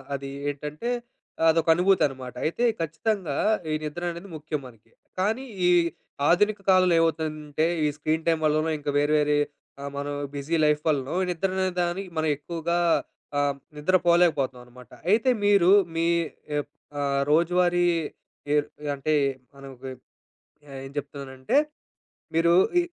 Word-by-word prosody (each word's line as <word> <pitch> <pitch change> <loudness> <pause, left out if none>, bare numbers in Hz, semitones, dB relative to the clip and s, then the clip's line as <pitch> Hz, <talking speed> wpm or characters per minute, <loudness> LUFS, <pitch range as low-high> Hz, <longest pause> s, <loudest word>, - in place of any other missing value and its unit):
అది 140 0 -6 0.2
ఏంటంటే 150 - -5 0.5
ఆ - - +2
అదొకనుభూతనమాట. 160 -6 +2
అయితే 170 +10 -1 0.2
ఖచ్చితంగా 165 0 -2 0.4
ఈ - - +2
నిద్ర 150 +3 -5
అనేది 170 +4 -9
ముఖ్యం 155 0 -4
మనకి. 115 -3 -19 0.3
కానీ 220 +7 0 0.2
ఈ - - +5 0.6
ఆధునిక 205 +4 +3
కాలంలో 185 -2 +5
ఏవవుతదంటే 155 -1 0 0.2
ఈ - - +3
స్క్రీన్ 155 +2 -1
టైమ్ 165 -1 +2
వల్లనో 155 +1 +2
ఇంకా 145 - -4
వేరే 145 +1 +2
వేరే 150 0 +2 0.4
ఆహ్, 140 0 -5
మనం 145 0 -3 0.2
బిజీ 145 +4 -2
లైఫ్ 150 0 +2
వల్లనో 140 0 -1 0.2
నిద్రనే 190 +2 -1 0.2
దానికి 180 +2 -3
మనం 155 0 +1
ఎక్కువగా 170 +2 -2 0.6
ఆహ్, 145 -1 +1 0.2
నిద్ర 150 +6 +1
పోలేకపోతామనమాట. 130 -8 +1 0.2
అయితే 225 +5 +3 0.2
మీరు 200 -3 +5 0.2
మీ 165 0 +1 0.5
ఎ - - +2 0.4
ఆహ్, 140 -1 +1
రోజువారీ 175 +2 +3 0.7
ఎరు 150 0 +2 0.3
అంటే 140 +2 -1 0.4
మనం 140 0 -11
ఒక 125 - -24 0.9
ఆహ్, 135 -1 -7
ఏం - - -8
జెప్తున్నానంటే, 140 - -3 0.8
మీరు 165 +1 +4 0.3
ఈ - - +4
155 Hz, 130 wpm, -25 LUFS, 145-175 Hz, 0.9 s, ఈ